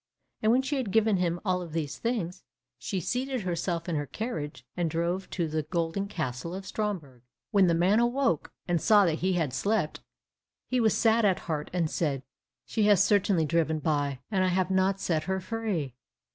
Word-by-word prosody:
And 220 Hz, -, +4 dB
when 255 Hz, +3 st, +3 dB
she 285 Hz, +2 st, -1 dB
had 255 Hz, -6 st, -2 dB
given 220 Hz, 0 st, +3 dB
him 175 Hz, -1 st, 0 dB
all 180 Hz, -2 st, +1 dB
these 155 Hz, -2 st, -4 dB
things, 205 Hz, -7 st, -2 dB, 0.4 s
she 195 Hz, -, -2 dB
seated 255 Hz, -, -2 dB
herself 170 Hz, -1 st, -2 dB
in 170 Hz, -, -1 dB
her 145 Hz, -1 st, -2 dB
carriage, 150 Hz, -, -5 dB
and 175 Hz, -2 st, 0 dB
drove 170 Hz, +4 st, -1 dB
to 170 Hz, -3 st, -1 dB
the 155 Hz, 0 st, -1 dB
golden 170 Hz, +5 st, -2 dB
castle 155 Hz, -2 st, -4 dB
of 190 Hz, 0 st, -6 dB
Stromberg. 180 Hz, -, -4 dB, 0.3 s
When 195 Hz, -3 st, +5 dB
the 170 Hz, -, +3 dB
man 185 Hz, +6 st, +4 dB
awoke 240 Hz, -, +1 dB, 0.2 s
and 175 Hz, -3 st, +1 dB
saw 205 Hz, -2 st, +6 dB
that 160 Hz, -2 st, 0 dB
he 185 Hz, +1 st, +1 dB
had 160 Hz, -7 st, 0 dB
slept, 200 Hz, -2 st, 0 dB, 0.7 s
he 255 Hz, -, +1 dB
was 220 Hz, -3 st, +3 dB
sad 225 Hz, 0 st, +4 dB
at 195 Hz, -3 st, +2 dB
heart, 155 Hz, -3 st, -3 dB
and 175 Hz, -3 st, +1 dB
said, 145 Hz, -4 st, -1 dB, 0.4 s
"She 215 Hz, -2 st, 0 dB
has 200 Hz, -2 st, +6 dB
certainly 200 Hz, -5 st, +3 dB
driven 160 Hz, 0 st, +1 dB
by, 145 Hz, -3 st, -1 dB
and 190 Hz, -3 st, +2 dB
I -, -, +3 dB
have 185 Hz, +1 st, +1 dB
not 190 Hz, +1 st, +2 dB
set 160 Hz, -4 st, 0 dB
her 190 Hz, +1 st, -1 dB
free." 190 Hz, -, -3 dB
180 Hz, 190 wpm, -28 LUFS, 160-210 Hz, 0.7 s, saw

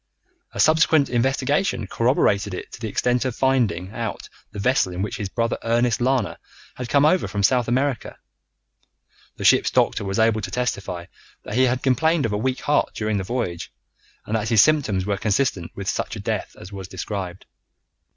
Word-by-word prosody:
A -, -, -7 dB
subsequent 155 Hz, -2 st, +4 dB
investigation 135 Hz, -, +1 dB
corroborated 105 Hz, -3 st, +1 dB
it -, -, -8 dB
to -, -, -10 dB
the 115 Hz, -, -3 dB
extent 125 Hz, +4 st, +1 dB
of 130 Hz, -3 st, -2 dB
finding 110 Hz, -9 st, +1 dB
out 115 Hz, -2 st, -5 dB, 0.2 s
the 105 Hz, -, -11 dB
vessel 125 Hz, -1 st, +2 dB
in 90 Hz, +2 st, -2 dB
which 115 Hz, +4 st, -4 dB
his 105 Hz, -5 st, -4 dB
brother 115 Hz, +2 st, -1 dB
Ernest 120 Hz, +1 st, +1 dB
Lana 120 Hz, -9 st, 0 dB, 0.3 s
had 125 Hz, -2 st, -6 dB
come 140 Hz, +2 st, +4 dB
over 180 Hz, +4 st, +3 dB
from 100 Hz, -1 st, -3 dB
South 125 Hz, +2 st, +3 dB
America. 130 Hz, 0 st, -1 dB, 1.2 s
The -, -, -7 dB
ship's -, -, +5 dB
doctor -, -, +1 dB
was 95 Hz, 0 st, -3 dB
able 110 Hz, -1 st, +3 dB
to 100 Hz, -, -5 dB
testify 100 Hz, -7 st, -3 dB, 0.4 s
that -, -, -7 dB
he 130 Hz, +3 st, +4 dB
had 125 Hz, 0 st, 0 dB
complained 150 Hz, +4 st, +2 dB
of 110 Hz, -, -1 dB
a -, -, 0 dB
weak 130 Hz, +3 st, -1 dB
heart 150 Hz, -, +1 dB
during 105 Hz, -1 st, -1 dB
the 95 Hz, -, -2 dB
voyage, 95 Hz, -6 st, -3 dB, 0.5 s
and 110 Hz, -, -2 dB
that 110 Hz, -1 st, -1 dB
his 110 Hz, -3 st, +6 dB
symptoms 120 Hz, -12 st, +1 dB
were 100 Hz, -1 st, -1 dB
consistent 100 Hz, -4 st, 0 dB
with 100 Hz, -1 st, -6 dB
such -, -, -2 dB
a -, -, -7 dB
death -, -, -3 dB
as 95 Hz, +3 st, -11 dB
was 95 Hz, -2 st, -7 dB
described. 95 Hz, -2 st, -5 dB
115 Hz, 185 wpm, -23 LUFS, 100-130 Hz, 1.2 s, his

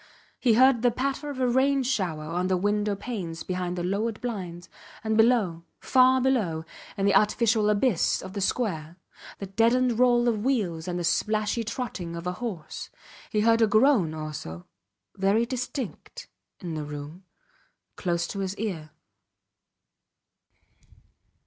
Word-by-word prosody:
He 240 Hz, -4 st, +3 dB
heard 260 Hz, -1 st, +5 dB
the 245 Hz, -, +4 dB
patter 275 Hz, +4 st, -2 dB
of 275 Hz, -2 st, -6 dB
a 255 Hz, -, +2 dB
rain 265 Hz, +2 st, +2 dB
shower 185 Hz, -12 st, -1 dB
on 175 Hz, +4 st, -2 dB
the 185 Hz, -1 st, +2 dB
window 205 Hz, +2 st, 0 dB
panes 190 Hz, -7 st, -5 dB
behind 180 Hz, -1 st, -3 dB
the 175 Hz, -, -2 dB
lowered 210 Hz, +5 st, -1 dB
blinds, 180 Hz, -8 st, -5 dB, 0.4 s
and 220 Hz, 0 st, 0 dB
below, 220 Hz, -7 st, +3 dB, 0.2 s
far 260 Hz, 0 st, +4 dB
below, 210 Hz, -12 st, 0 dB, 0.3 s
in 195 Hz, -, 0 dB
the 200 Hz, -, +4 dB
artificial 215 Hz, 0 st, +3 dB
abyss 210 Hz, -2 st, +2 dB
of 190 Hz, -, -8 dB
the 200 Hz, -, -3 dB
square, 175 Hz, -7 st, -2 dB, 0.4 s
the 200 Hz, -, -5 dB
deadened 230 Hz, +4 st, +2 dB
roll 245 Hz, -1 st, +4 dB
of 215 Hz, -3 st, 0 dB
wheels 195 Hz, -11 st, -1 dB
and 180 Hz, -1 st, -2 dB
the 175 Hz, -, -2 dB
splashy 215 Hz, +6 st, 0 dB
trotting 210 Hz, -7 st, -5 dB
of 170 Hz, +1 st, -7 dB
a 180 Hz, -, 0 dB
horse. 190 Hz, -11 st, -5 dB, 0.4 s
He 210 Hz, -, +1 dB
heard 230 Hz, +1 st, +4 dB
a 225 Hz, -, +5 dB
groan 215 Hz, -, +3 dB
also 150 Hz, -, -6 dB, 0.5 s
very 200 Hz, +4 st, +2 dB
distinct 255 Hz, -1 st, -5 dB, 0.3 s
in 175 Hz, -3 st, -5 dB
the 155 Hz, -1 st, -3 dB
room 150 Hz, +4 st, -8 dB, 0.7 s
close 170 Hz, -2 st, -1 dB
to 200 Hz, -, -5 dB
his 195 Hz, +1 st, -3 dB
ear. 180 Hz, -8 st, -4 dB
210 Hz, 150 wpm, -26 LUFS, 175-240 Hz, 0.7 s, heard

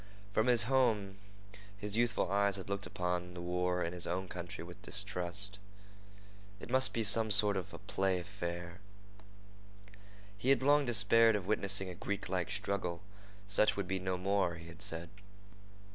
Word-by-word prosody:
From 110 Hz, +3 st, +2 dB
his 120 Hz, -3 st, +4 dB
home 110 Hz, -6 st, +1 dB, 0.6 s
his 105 Hz, 0 st, -2 dB
youthful 115 Hz, -5 st, +1 dB
eyes 100 Hz, -1 st, +2 dB
had 100 Hz, 0 st, -5 dB
looked 100 Hz, 0 st, -2 dB
upon 90 Hz, 0 st, -3 dB
the 90 Hz, -, -8 dB
war 90 Hz, +1 st, -1 dB
in 85 Hz, -, -3 dB
his 90 Hz, -1 st, -1 dB
own 95 Hz, +2 st, -2 dB
country 90 Hz, -1 st, -7 dB
with 85 Hz, +1 st, -11 dB
distrust. 95 Hz, 0 st, -2 dB, 1.0 s
It -, -, -9 dB
must 130 Hz, 0 st, +3 dB
be 115 Hz, -, -1 dB
some 110 Hz, +2 st, +3 dB
sort 105 Hz, 0 st, +5 dB
of 95 Hz, -2 st, -4 dB
a -, -, -8 dB
play 95 Hz, -1 st, -1 dB
affair. 85 Hz, -1 st, -6 dB, 1.6 s
He 110 Hz, +6 st, -2 dB
had 135 Hz, -1 st, +4 dB
long 145 Hz, 0 st, +4 dB
despaired 115 Hz, 0 st, +5 dB
of 100 Hz, -3 st, -3 dB
witnessing 100 Hz, -1 st, +1 dB
a 90 Hz, -, -5 dB
Greeklike 95 Hz, 0 st, -3 dB
struggle. 100 Hz, -4 st, -3 dB, 0.4 s
Such 100 Hz, +1 st, +3 dB
would 100 Hz, -2 st, -2 dB
be 95 Hz, 0 st, -1 dB
no 95 Hz, 0 st, -2 dB
more, 95 Hz, -2 st, 0 dB
he 85 Hz, 0 st, -11 dB
had 85 Hz, +2 st, -12 dB
said. 85 Hz, -2 st, 0 dB
95 Hz, 160 wpm, -34 LUFS, 90-105 Hz, 1.6 s, sort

